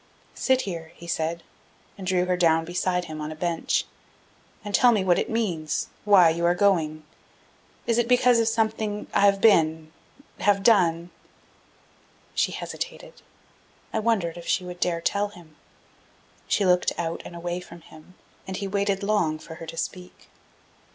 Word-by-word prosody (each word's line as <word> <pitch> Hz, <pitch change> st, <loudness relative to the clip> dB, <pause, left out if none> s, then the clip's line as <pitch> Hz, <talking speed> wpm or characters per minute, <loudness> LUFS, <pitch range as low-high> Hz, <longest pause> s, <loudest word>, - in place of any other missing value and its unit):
"Sit 260 Hz, -1 st, +1 dB
here," 165 Hz, -6 st, -6 dB
he 170 Hz, -, -12 dB
said, 165 Hz, 0 st, -2 dB, 0.5 s
and 190 Hz, -3 st, -8 dB
drew 180 Hz, -1 st, +2 dB
her 180 Hz, 0 st, +1 dB
down 165 Hz, -2 st, +3 dB
beside 180 Hz, +1 st, -1 dB
him 155 Hz, -2 st, -7 dB
on 150 Hz, +1 st, -4 dB
a -, -, -7 dB
bench, 170 Hz, 0 st, -1 dB, 0.8 s
"and 205 Hz, -, -5 dB
tell 245 Hz, +3 st, +6 dB
me 210 Hz, -4 st, +1 dB
what 180 Hz, -2 st, +3 dB
it -, -, -2 dB
means, 180 Hz, -9 st, -2 dB, 0.2 s
why 190 Hz, -5 st, +6 dB
you 170 Hz, +1 st, -3 dB
are 175 Hz, +1 st, +3 dB
going. 165 Hz, -6 st, +1 dB, 0.8 s
Is 235 Hz, 0 st, +1 dB
it 235 Hz, -, +1 dB
because 250 Hz, -1 st, +4 dB
of 225 Hz, -, +2 dB
something 220 Hz, -2 st, -1 dB
that -, -, -15 dB
I -, -, +4 dB
have 200 Hz, 0 st, +3 dB
been 160 Hz, -6 st, +3 dB, 0.5 s
have 200 Hz, 0 st, +2 dB
done?" 175 Hz, -6 st, +3 dB, 1.2 s
She -, -, +1 dB
hesitated. -, -, -7 dB, 0.7 s
I -, -, +1 dB
wondered 205 Hz, -7 st, 0 dB
if 170 Hz, -, -10 dB
she -, -, +1 dB
would 180 Hz, 0 st, -8 dB
dare 170 Hz, -2 st, 0 dB
tell 200 Hz, +4 st, 0 dB
him. 175 Hz, -6 st, -16 dB, 0.9 s
She 205 Hz, -, +1 dB
looked 180 Hz, -1 st, +3 dB
out 165 Hz, -1 st, -3 dB
and 175 Hz, -, -10 dB
away 175 Hz, +1 st, -4 dB
from 175 Hz, -1 st, -12 dB
him, 160 Hz, +3 st, -17 dB, 0.3 s
and 190 Hz, -1 st, -4 dB
he 200 Hz, -, -3 dB
waited 200 Hz, 0 st, -1 dB
long 200 Hz, -7 st, +1 dB
for 160 Hz, -, -11 dB
her 165 Hz, -, -7 dB
to 165 Hz, -, -8 dB
speak. 180 Hz, +2 st, -6 dB
180 Hz, 170 wpm, -25 LUFS, 165-205 Hz, 1.2 s, tell